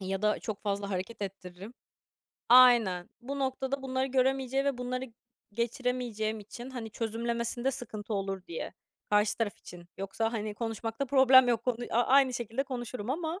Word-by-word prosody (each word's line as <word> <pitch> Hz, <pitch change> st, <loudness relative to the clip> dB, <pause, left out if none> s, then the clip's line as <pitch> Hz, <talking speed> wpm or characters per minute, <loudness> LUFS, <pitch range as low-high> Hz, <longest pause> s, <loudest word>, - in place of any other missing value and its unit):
ya 190 Hz, +1 st, -3 dB
da 210 Hz, 0 st, +2 dB
çok 215 Hz, -2 st, -6 dB
fazla 200 Hz, -1 st, -2 dB
hareket 195 Hz, +3 st, -4 dB
ettiririm. 195 Hz, +3 st, -8 dB, 0.7 s
Aynen. 235 Hz, -8 st, +6 dB
Bu 275 Hz, +4 st, -5 dB
noktada 265 Hz, 0 st, -2 dB
bunları 260 Hz, 0 st, -1 dB
göremeyeceği 265 Hz, 0 st, +1 dB
ve 280 Hz, -3 st, 0 dB
bunları 250 Hz, +1 st, -3 dB, 0.5 s
geçiremeyeceğim 235 Hz, -1 st, -2 dB
için, 240 Hz, +5 st, -9 dB
hani, 235 Hz, -4 st, -6 dB
çözümlemesinde 235 Hz, +3 st, -2 dB
sıkıntı 220 Hz, -4 st, -5 dB
olur 195 Hz, -2 st, -3 dB
diye. 165 Hz, -, -5 dB, 0.4 s
Karşı 210 Hz, +1 st, +3 dB
taraf 225 Hz, -3 st, -1 dB
için. 175 Hz, -1 st, -12 dB
Yoksa, 210 Hz, +4 st, -2 dB
hani, 215 Hz, -2 st, -3 dB
konuşmakta 225 Hz, +3 st, -3 dB
problem 260 Hz, -1 st, +7 dB
yok. 230 Hz, -1 st, +1 dB
Konu 250 Hz, -2 st, +1 dB
a 235 Hz, -, +2 dB
a 240 Hz, -, +1 dB
aynı 265 Hz, -1 st, +5 dB
şekilde 240 Hz, +3 st, -2 dB
konuşurum 245 Hz, -3 st, -5 dB
ama, 325 Hz, +4 st, -2 dB
235 Hz, 155 wpm, -30 LUFS, 210-260 Hz, 0.7 s, problem